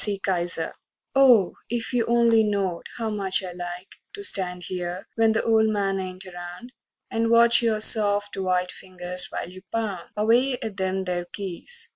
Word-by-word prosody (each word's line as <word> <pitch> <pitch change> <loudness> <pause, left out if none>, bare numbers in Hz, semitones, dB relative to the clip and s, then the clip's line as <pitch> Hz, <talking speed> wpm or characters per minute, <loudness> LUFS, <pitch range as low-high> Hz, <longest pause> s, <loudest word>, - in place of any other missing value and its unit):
E. 205 -1 -1
KISER 175 -4 -1
I - - -33 0.3
Oh, 250 -9 +5 0.2
if 235 +1 -3
you 240 -2 +1
only 235 -1 +4
knowed 200 -5 -1
how 225 -2 -2
much 195 -2 0
I 185 - -5
like 175 +1 -8 0.2
To 405 - -8
stand 180 - +2
here, 180 +1 -4
when 225 -1 +3
the 225 - 0
"old 220 -1 +3
man" 200 -2 0
ain't 185 0 -6
around, 180 +7 -9 0.4
And 225 -1 0
watch 235 +1 +6
your 220 -2 +1
soft, 205 -2 +1
white 185 -1 0
fingers 180 -1 -3
while - - -4
you 185 +1 -11
pound 210 -6 -3
Away 240 +5 +3
at 220 -3 -6
them 190 0 -1
there 180 -1 -2
keys! 205 - -3
200 Hz, 175 wpm, -24 LUFS, 180-225 Hz, 0.4 s, watch